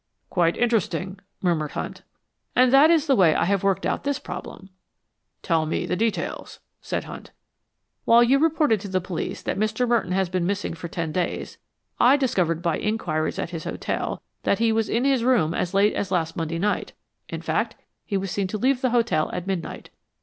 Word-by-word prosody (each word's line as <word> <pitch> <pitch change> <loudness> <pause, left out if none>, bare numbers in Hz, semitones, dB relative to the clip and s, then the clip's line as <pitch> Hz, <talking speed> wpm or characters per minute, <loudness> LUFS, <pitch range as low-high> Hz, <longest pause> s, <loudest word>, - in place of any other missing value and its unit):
"Quite 170 -2 +2
interesting," 200 -5 0 0.2
murmured 160 -5 0
Hunt. - - -5 0.5
"And 255 0 +5
that 285 +4 +7
is 325 -3 +4
the 275 -4 +3
way 170 -8 +5
I - - +2
have 195 +1 +1
worked 195 -1 +1
out - - -1
this 280 -1 0
problem." 190 0 -8 0.7
"Tell 165 -3 +1
me - - -1
the - - -1
details," 225 +2 -2 0.2
said - - -3
Hunt. - - -9 0.8
"While 235 +1 +6
you 265 +3 +4
reported 305 -7 +3
to 205 - -6
the 185 -1 0
police 180 -2 -5
that - - -2
Mr. 220 +3 0
Merton 230 -6 +1
had 190 -2 0
been 180 -2 0
missing 200 -2 -2
for 170 +1 -7
ten 165 -1 -3
days, 175 +2 -3 0.4
I 260 +4 +6
discovered 180 - 0
by 170 -2 0
inquiries 175 -8 -1
at 170 - -3
his 165 -2 -6
hotel - - -3 0.2
that 200 - +1
he 230 0 +2
was 225 0 0
in 240 +3 +1
his 270 -4 +2
room 235 -11 +3
as 180 +2 -2
late 205 +2 +4
as 195 - -2
last 165 -3 -1
Monday 165 0 -2
night. 205 +4 -1 0.4
In - - -6
fact, - - -1 0.3
he 200 - -2
was 195 -1 -3
seen 200 0 -1
to 215 - -3
leave 255 +3 +1
the 255 - +2
hotel 230 -9 +1
at 180 -1 -4
midnight." 190 -3 -4
195 Hz, 195 wpm, -24 LUFS, 175-235 Hz, 0.8 s, that